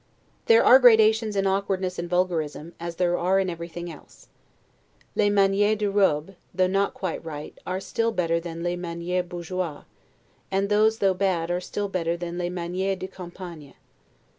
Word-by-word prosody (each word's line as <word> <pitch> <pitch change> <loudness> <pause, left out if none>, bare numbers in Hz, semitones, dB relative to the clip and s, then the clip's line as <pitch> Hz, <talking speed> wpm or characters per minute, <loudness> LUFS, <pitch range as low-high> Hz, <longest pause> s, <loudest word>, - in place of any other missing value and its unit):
There 460 0 +6
are 260 - +9
gradations 220 -3 +5
in 195 0 +1
awkwardness 190 -1 -1
and 170 0 -4
vulgarism, 170 -3 -1
as 170 0 -5
there 175 0 +1
are 185 +2 +2
in 190 -2 0
everything 170 0 -7
else. 155 - -16 0.9
'Les 205 - +3
manieres 205 +1 +3
de 205 -1 -1
robe', 195 -4 +2 0.2
though 185 - +3
not 195 +2 0
quite 185 -4 -4
right, 150 -2 -7
are 185 +1 -2
still 230 +3 -1
better 170 -5 0
than 170 0 -7
'les 175 0 -1
manieres 175 +1 -3
bourgeoises'; 175 -3 -4 0.6
and 195 +1 0
these, 215 +1 +3
though 195 -3 +2
bad, 180 -3 0
are 175 +1 -1
still 205 +2 -3
better 170 -3 -1
than 175 0 -5
'les 175 0 -1
manieres 180 +2 -2
de 185 +1 -5
campagne'. 175 -5 -10
185 Hz, 165 wpm, -25 LUFS, 170-195 Hz, 0.9 s, are